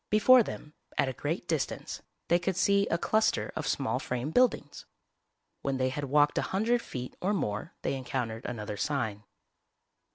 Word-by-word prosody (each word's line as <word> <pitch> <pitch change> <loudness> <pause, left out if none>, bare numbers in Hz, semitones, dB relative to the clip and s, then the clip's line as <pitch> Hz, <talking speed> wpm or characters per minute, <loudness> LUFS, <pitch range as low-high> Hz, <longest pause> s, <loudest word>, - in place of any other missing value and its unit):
Before 245 +4 +7
them, 150 -8 -6 0.2
at 135 - +2
a - - -4
great 160 +7 -3
distance, 160 -4 -2 0.3
they 175 - +4
could 185 +1 -1
see 200 +2 +3
a 170 - +1
cluster 220 +5 +1
of 155 - -3
small 130 -3 0
frame 125 +3 -3
buildings. 240 - +1 0.7
When 135 -1 -1
they 130 0 +1
had 145 +2 -3
walked 145 +2 +3
a - - -2
hundred 230 +5 +1
feet 125 - -6
or 200 +3 +1
more 105 - -3
they - - 0
encountered 125 -4 -3
another 105 -3 -5
sign. 110 -8 -2
145 Hz, 165 wpm, -29 LUFS, 125-190 Hz, 0.7 s, Before